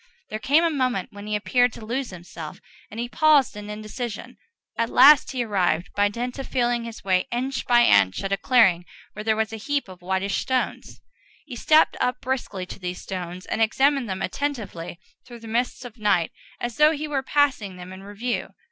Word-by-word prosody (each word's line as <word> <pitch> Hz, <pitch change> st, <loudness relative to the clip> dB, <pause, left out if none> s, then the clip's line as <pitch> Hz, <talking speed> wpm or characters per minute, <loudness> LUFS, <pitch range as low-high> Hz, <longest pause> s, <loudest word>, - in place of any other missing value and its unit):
There 215 Hz, -, -3 dB
came 290 Hz, +8 st, +3 dB
a 335 Hz, -, +2 dB
moment 255 Hz, -, -1 dB
when 205 Hz, +1 st, -9 dB
he 210 Hz, -, -1 dB
appeared 245 Hz, +3 st, +2 dB
to 220 Hz, -, -10 dB
lose 250 Hz, +3 st, -2 dB
himself, 170 Hz, -3 st, -9 dB, 0.3 s
and 220 Hz, -, -8 dB
he 240 Hz, -, -2 dB
paused 295 Hz, -2 st, +3 dB
in 210 Hz, 0 st, -8 dB
indecision. 215 Hz, +1 st, -6 dB, 0.4 s
At 230 Hz, 0 st, 0 dB
last 285 Hz, +3 st, +7 dB
he 255 Hz, -2 st, -1 dB
arrived, 185 Hz, -5 st, 0 dB
by 205 Hz, 0 st, +3 dB
dint 245 Hz, +5 st, -5 dB
of 270 Hz, -, -5 dB
feeling 240 Hz, -2 st, 0 dB
his 230 Hz, -1 st, -9 dB
way 185 Hz, -1 st, +1 dB
inch 260 Hz, +3 st, -2 dB
by 240 Hz, -1 st, +6 dB
inch, 95 Hz, -1 st, +4 dB
at 195 Hz, -, -3 dB
a -, -, +3 dB
clearing 195 Hz, -10 st, +4 dB, 0.3 s
where 210 Hz, -, -7 dB
there 220 Hz, 0 st, +2 dB
was 220 Hz, -1 st, 0 dB
a 225 Hz, -, -5 dB
great 210 Hz, -, -12 dB
heap 290 Hz, -4 st, 0 dB
of 185 Hz, -1 st, -12 dB
whitish 190 Hz, +2 st, -1 dB
stones. 260 Hz, -1 st, -2 dB, 0.4 s
He 260 Hz, -, -8 dB
stepped 310 Hz, +6 st, +4 dB
up 250 Hz, 0 st, 0 dB
briskly 235 Hz, -8 st, -3 dB
to 180 Hz, -, -10 dB
these 180 Hz, -1 st, -5 dB
stones, 180 Hz, -1 st, -6 dB
and -, -, -2 dB
examined 265 Hz, +2 st, +2 dB
them 190 Hz, 0 st, -3 dB
attentively 200 Hz, -10 st, -4 dB, 0.3 s
through 240 Hz, -2 st, -11 dB
the 225 Hz, -, -10 dB
mists 245 Hz, +3 st, -2 dB
of 240 Hz, -1 st, -11 dB
night, 200 Hz, -6 st, +2 dB, 0.3 s
as 240 Hz, -2 st, -4 dB
though 300 Hz, +1 st, +6 dB
he 305 Hz, 0 st, -4 dB
were 285 Hz, -3 st, -1 dB
passing 265 Hz, -9 st, +1 dB
them 180 Hz, +1 st, -9 dB
in 190 Hz, -, -10 dB
review. 205 Hz, +5 st, -4 dB
225 Hz, 205 wpm, -24 LUFS, 195-255 Hz, 0.4 s, last